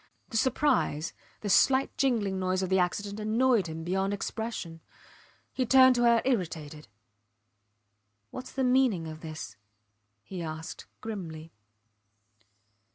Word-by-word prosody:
The 225 - -2
surprise, 250 - +1 0.3
the 205 - -3
slight 265 +5 +4
jingling 215 -8 +1
noise 185 0 0
of 185 - -2
the 190 0 +3
accident 200 +3 -1
annoyed 220 -1 +2
him 160 0 -6
beyond 190 +3 0
expression. 200 -6 -5 0.7
He 260 - 0
turned 260 +1 +7
to 240 -1 +2
her 235 -1 +4
irritated. 160 - -2 1.4
Whats 255 0 -8
the 265 - -1
meaning 250 -10 +2
of 155 0 -8
this? 155 -7 -7 0.7
he 185 - -7
asked, 160 0 -6
grimly. 165 -7 -6
200 Hz, 120 wpm, -29 LUFS, 165-245 Hz, 1.4 s, turned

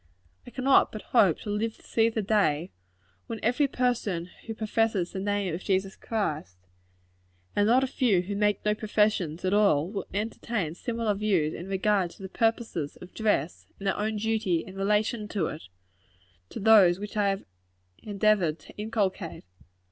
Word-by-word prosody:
I - - -6
cannot 260 +2 +3
but 215 -2 -7
hope 200 -10 +5
to 205 - -4
live 220 +2 -1
to - - -22
see 225 0 +2
the 220 -2 -2
day, 185 -6 +1 0.6
when 225 - -5
every 250 +5 +2
person 225 -10 -1 0.2
who 225 - -4
professes 220 -4 0
the 190 - -4
name 200 -2 -1
of 170 - -5
Jesus 190 0 0
Christ, 155 - -3 1.0
and 205 0 +3
not 250 +4 +4
a - - +1
few 240 -8 +2
who 200 +2 -4
make 210 0 +1
no 210 - +3
professions 210 -6 0
at 185 - +1
all, 195 -5 +3
will 200 - -4
entertain 210 -4 -2
similar 230 +3 -2
views 195 -7 +1
in 175 - -7
regard 195 -1 +1
to 195 - -14
the 190 - -6
purposes 225 -9 -1
of 180 - -12
dress 205 -8 -1
and 200 - -9
their 195 - +1
own 215 +1 -1
duty 210 -6 0
in 190 - -11
relation 210 +2 0
to 205 -3 -1
it, 155 - -6 0.8
to - - -7
those 200 -5 +6
which 205 +2 -7
I 205 -1 +2
have 195 0 -2 0.6
endeavored 205 -6 +1
to - - -15
inculcate. 205 -5 -2
205 Hz, 170 wpm, -27 LUFS, 185-220 Hz, 1.0 s, those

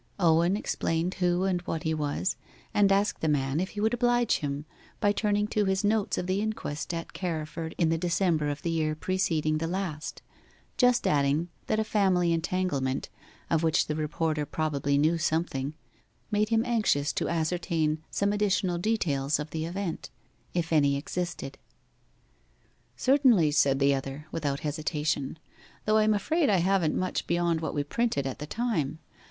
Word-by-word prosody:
Owen 170 +2 +4
explained 165 -3 -1
who 180 0 +2
and 185 -2 +1
what 160 -2 -2
he 160 - 0
was, 150 +4 -1 0.4
and 200 -1 +4
asked 200 +2 +1
the 160 - 0
man 140 -1 +1
if 190 +2 -1
he - - -1
would 220 +2 +2
oblige 240 -1 +2
him 145 0 -4 0.3
by 205 - +3
turning 205 0 +1
to 210 -2 +1
his 190 +1 +1
notes 210 0 +1
of - - -2
the 185 +2 0
inquest 215 -10 -3
at 165 -1 -5
Carriford 160 -2 -4
in 165 - +2
the 165 0 +1
December 170 -3 +1
of 145 0 -4
the 170 - 0
year 155 -2 0
preceding 155 -3 0
the 165 - -2
last 175 -4 -4 0.5
just 250 -1 +3
adding 145 +3 +2 0.2
that 215 - +1
a - - +2
family 185 -5 +2
entanglement, 165 -6 -1 0.4
of 165 -2 +1
which 160 -2 +2
the 150 - -2
reporter 155 0 -1
probably 145 -2 0
knew 160 +4 +2
something, 155 -4 -1 0.6
made 210 +1 +2
him 225 +1 +2
anxious 210 - +1
to - - -1
ascertain 160 -2 0
some 200 0 0
additional 190 -4 +1
details 155 -9 0
of 150 0 -6
the 160 0 -2
event, 170 -5 -4 0.5
if 170 -1 -1
any 140 -2 +4
existed. 165 -2 -4 1.4
'Certainly,' 255 - +4
said 140 -2 +3
the 140 0 +3
other, 135 +2 -4
without 140 -3 -2
hesitation; 150 -1 -2 0.5
'though 215 0 +3
I 215 - +4
am 215 0 +3
afraid 310 - +1
I 200 - +4
haven't 180 -2 +2
much 185 0 -2
beyond 170 -1 +1
what 160 - -3
we 145 - +1
printed 145 - -1
at 135 - -4
the 150 - -6
time. 165 - -1
165 Hz, 170 wpm, -28 LUFS, 150-195 Hz, 1.4 s, Owen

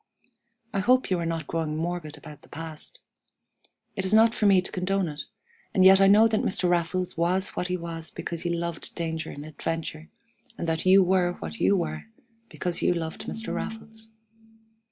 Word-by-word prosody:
I 195 - 0
hope 250 +3 +3
you 180 - +2
are 170 - -2
not 165 -2 -3
growing 155 -1 -2
morbid 165 -2 -4
about 150 -1 -12
the - - -19
past. 165 - -5 0.9
It 190 - -2
is 190 +3 +3
not 225 +1 +6
for 215 -3 +2
me 195 -2 +6
to 180 - -5
condone 190 0 0
it, 150 -1 -6 0.5
and 185 - +5
yet 190 +1 +8
I 195 - +7
know 210 +3 +7
that 215 -1 +1
Mr. 185 -1 +1
Raffles 175 +1 0
was 180 +3 +1
what 180 - -3
he 180 0 -1
was 165 -1 -6
because 170 -1 -5
he 175 - -2
loved 170 -1 -3
danger 160 -2 -3
and 145 +1 -8
adventure, 155 +1 -5 0.5
and 170 - -4
that 160 +2 -1
you 190 +1 +7
were 180 -1 +2
what 225 - -8
you 200 - +4
were 170 - -3 0.4
because 175 -2 -2
you 180 - +2
loved 160 -1 -5
Mr. 225 - -3
Raffles. 220 0 -7
175 Hz, 190 wpm, -26 LUFS, 165-195 Hz, 0.9 s, yet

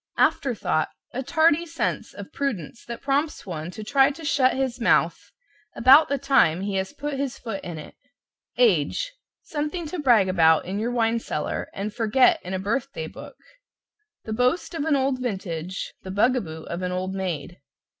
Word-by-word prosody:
=AFTERTHOUGHT= 220 - +1 0.2
A 255 - -2
tardy 315 +4 +3
sense 330 -1 -3
of - - -9
prudence 235 - -3
that 235 -1 -7
prompts 285 +3 0
one 165 -3 -5
to 215 +4 -8
try 270 +5 +4
to 315 +3 -8
shut 260 -3 +3
his 260 -2 -2
mouth - - +2 0.5
about 270 +6 +7
the 280 - +1
time 265 - +3
he 200 0 -3
has 190 0 -2
put 290 -1 -4
his 275 -2 -2
foot 225 -5 -6
in 175 -2 -6
it. 150 - -10 0.6
=AGE= - - +2 0.3
Something 305 +3 -3
to 325 +3 -5
brag 240 -9 +4
about 160 -4 +4
in 190 +3 -3
your 225 +3 -1
wine 230 -1 +1
cellar 150 -8 -3
and 205 +2 -5
forget 230 +4 +3
in 185 +1 -4
a - - 0
birth 235 +8 -2
day 160 - -4
book - - -11 0.9
The 220 - -4
boast 250 +11 +1
of 315 -3 -2
an 315 -2 +3
old 265 -1 +1
vintage, 185 -6 -4
the 190 - -9
bug 210 +7 +3
a 250 - 0
boo 160 -4 -8
of 170 +2 -5
an 180 0 -2
old 185 +1 -2
maid. 175 -4 -4
235 Hz, 185 wpm, -24 LUFS, 185-275 Hz, 0.9 s, about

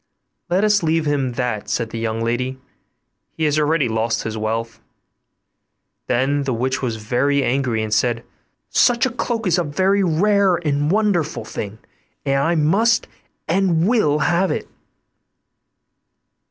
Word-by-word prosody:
'Let 185 +3 +2
us 210 -1 +3
leave 160 -1 +1
him 140 -4 0
that,' 120 -4 -3
said 115 -2 -2
the 115 - -4
young 115 0 -2
lady; 125 +3 -2 0.8
'he 160 - -2
has 150 0 +2
already 150 -2 +2
lost 115 0 -1
his 110 0 -4
wealth.' 115 +1 -3 1.3
Then 135 +4 +1
the 135 -3 -1
witch 130 +3 -1
was 120 -4 -2
very 125 +6 0
angry, 125 -4 0
and 110 -1 -3
said, 120 +1 +1 0.5
'Such 245 +1 +3
a 260 - -1
cloak 230 -1 -3
is 180 -1 +2
a - - +1
very 190 +6 +1
rare 190 +2 +3
and 145 -3 -1
wonderful 195 -5 0
thing, 105 0 -6 0.5
and 135 -1 +1
I 165 +5 +1
must 205 +9 +2 0.4
and 175 -1 +2
will 210 -11 +2
have 175 +5 +1
it. - - -3
145 Hz, 145 wpm, -20 LUFS, 120-180 Hz, 1.3 s, us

